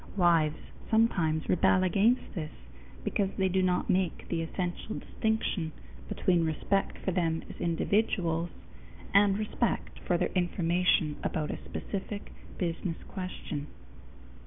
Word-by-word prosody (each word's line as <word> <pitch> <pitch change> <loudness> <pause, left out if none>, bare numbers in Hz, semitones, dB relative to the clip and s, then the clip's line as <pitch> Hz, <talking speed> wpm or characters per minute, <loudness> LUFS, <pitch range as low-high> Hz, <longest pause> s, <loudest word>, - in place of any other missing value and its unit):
Wives 165 -4 +4 0.3
sometimes 170 -9 +2
rebel 185 +1 +4
against 205 +7 +2
this, 155 -5 -3 0.5
because 195 - +1
they 190 -1 +2
do 190 +1 +2
not 180 -1 +1
make 185 -2 0
the 165 -1 0
essential 175 +5 -3
distinction 220 -7 -1 0.4
between 175 -3 +2
respect 165 +5 0
for 190 - +2
them 165 -3 0
as - - -10
individuals 170 -1 +1 0.6
and 200 0 +5
respect 215 +2 -1
for 175 - +1
their - - +1
information 175 -3 +2
about 155 -2 -1
a - - -6
specific 200 +1 -5 0.3
business 170 -1 -2
question. 170 -6 -5
180 Hz, 120 wpm, -30 LUFS, 165-195 Hz, 0.6 s, and